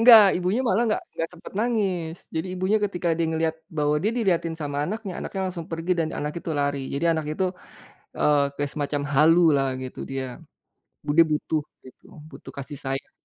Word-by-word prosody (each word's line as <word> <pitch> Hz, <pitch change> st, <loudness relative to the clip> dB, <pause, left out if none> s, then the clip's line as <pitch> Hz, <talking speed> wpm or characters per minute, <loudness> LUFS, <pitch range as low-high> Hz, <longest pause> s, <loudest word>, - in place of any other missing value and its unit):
Nggak, 230 Hz, -2 st, +10 dB
ibunya 185 Hz, +7 st, +1 dB
malah 230 Hz, -1 st, +3 dB
nggak 215 Hz, -, 0 dB
nggak 165 Hz, -, -2 dB
sempat 175 Hz, -, -11 dB
nangis. 195 Hz, -8 st, 0 dB, 0.2 s
Jadi 160 Hz, +3 st, -1 dB
ibunya 190 Hz, +4 st, +2 dB
ketika 180 Hz, -3 st, -1 dB
dia 165 Hz, 0 st, +1 dB
ngelihat 160 Hz, 0 st, 0 dB
bahwa 150 Hz, -2 st, +1 dB
dia 205 Hz, -, +2 dB
dilihatin 170 Hz, -7 st, +1 dB
sama 145 Hz, -3 st, -4 dB
anaknya, 210 Hz, -2 st, -4 dB
anaknya 195 Hz, -, -4 dB
langsung 170 Hz, -2 st, -7 dB
pergi 165 Hz, +2 st, 0 dB
dan 160 Hz, -, +1 dB
anak 150 Hz, +1 st, -2 dB
itu -, -, -5 dB
lari. 140 Hz, 0 st, 0 dB
Jadi 140 Hz, +4 st, -1 dB
anak 160 Hz, -2 st, -2 dB
itu, 190 Hz, -, 0 dB, 0.7 s
eee, 145 Hz, -1 st, +4 dB
kayak 145 Hz, 0 st, -2 dB
semacam 145 Hz, -1 st, -1 dB
halu 160 Hz, +5 st, +6 dB, 0.2 s
lah, 135 Hz, -1 st, +2 dB
gitu 130 Hz, -, -7 dB
dia. 135 Hz, 0 st, -2 dB, 0.8 s
Bu 150 Hz, -, -6 dB
dia 165 Hz, -, +8 dB
butuh 155 Hz, +1 st, 0 dB, 0.2 s
gitu, 130 Hz, -, -15 dB, 0.3 s
butuh -, -, -11 dB
kasih 140 Hz, +1 st, -6 dB
sayang. 135 Hz, 0 st, -3 dB
165 Hz, 185 wpm, -25 LUFS, 145-185 Hz, 0.8 s, Nggak